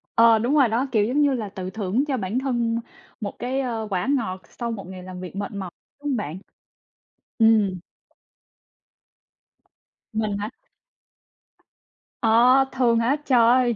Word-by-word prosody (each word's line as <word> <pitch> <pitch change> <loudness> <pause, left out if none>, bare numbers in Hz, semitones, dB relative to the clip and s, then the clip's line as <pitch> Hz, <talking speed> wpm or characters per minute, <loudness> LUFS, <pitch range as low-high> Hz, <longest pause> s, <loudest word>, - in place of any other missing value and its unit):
Ờ, 230 -1 +6
đúng 245 +6 +1
rồi 275 -5 +5
đó. 235 +5 0
Kiểu, 215 -4 +3
giống 265 +6 +1
như 285 -2 +3
là 220 -5 -3
tự 185 -2 -6
thưởng 210 +5 -1
cho 265 -3 0
bản 210 +5 -2
thân 235 -3 0 0.4
một 200 - -4
cái, 255 +2 -2
ờ, 230 -4 -3
quả 185 +3 -1
ngọt 190 -6 -4
sau 235 -1 -4
một 195 -5 -6
ngày 185 -1 -9
làm 185 0 -8
việc 185 +1 -8
mệt 200 0 -4
mỏi, 190 -3 -5 0.3
đúng 290 - -4
hông 260 - 0
bạn? 170 -4 -4 1.0
Ừm. 215 -5 +4 2.4
Mình 215 -2 -1
hả? 210 +2 -3 1.7
Ờ, 245 +4 +5
thường 240 -3 +2
hả? 240 +5 +2
Trời 255 -3 +4
ơi! 240 +1 +4
230 Hz, 155 wpm, -24 LUFS, 200-250 Hz, 2.4 s, Ờ